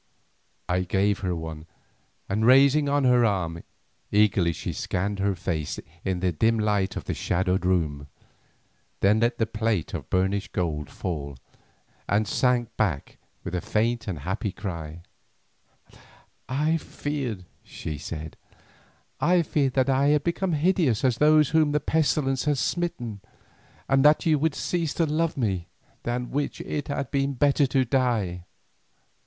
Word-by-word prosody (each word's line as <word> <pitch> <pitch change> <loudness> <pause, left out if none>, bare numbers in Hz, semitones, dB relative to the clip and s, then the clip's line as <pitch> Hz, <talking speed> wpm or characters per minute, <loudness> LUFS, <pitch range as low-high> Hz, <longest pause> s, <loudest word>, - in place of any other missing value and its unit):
I 90 +1 +1
gave 95 +2 +1
her 90 -2 -1
one, 80 -1 -7 0.6
and 105 +3 -1
rising 140 +4 +5
on 145 0 +2
her 125 -2 +5
arm, 90 -6 0 0.5
eagerly 100 -4 +3
she - - -5
scanned 100 +2 -2
her 100 0 +1
face 85 -4 -3 0.2
in 95 -2 -2
the 90 -1 +1
dim 110 +8 +2
light 105 -3 0
of - - -4
the - - -3
shadowed 90 0 0
room, 75 -6 0 0.9
then 105 +3 +4
let 115 +1 +1
the 115 - +2
plate 110 -5 -1
of - - -5
burnished 95 +1 0
gold 75 -4 -2
fall, 70 -6 -5 0.7
and 105 +1 +2
sank 120 -2 +1
back 90 -11 -1 0.2
with - - -6
a 90 - -1
faint 115 +3 0
and 85 -8 -4
happy 95 +5 -2
cry: 85 -4 -6 1.5
"I 150 +5 +1
feared," 135 - -4 0.2
she 75 -3 -6
said, 80 0 -7 0.8
"I 175 -1 +3
feared 140 -4 0
that 130 -1 +2
I 135 +2 +3
had 150 0 +3
become 175 +1 -1
hideous 155 - +2
as 125 -3 +1
those 150 -1 +5
are 160 - +5
whom 150 -2 +2
the 150 - +3
pestilence 145 -3 +1
has 145 -3 +1
smitten, 120 - -2 0.7
and 135 0 +3
that 150 +1 +5
you 155 -3 +3
would 155 0 +1
cease 165 -4 -2
to 165 - +2
love 160 +1 0
me, 95 -9 -1 0.3
than 125 +1 -3
which 145 +1 -2
it 145 - -4
had 140 -2 -3
been 140 0 0
better 140 +2 +3
to 130 +1 +2
die." 115 -9 0
115 Hz, 150 wpm, -26 LUFS, 90-140 Hz, 1.5 s, rising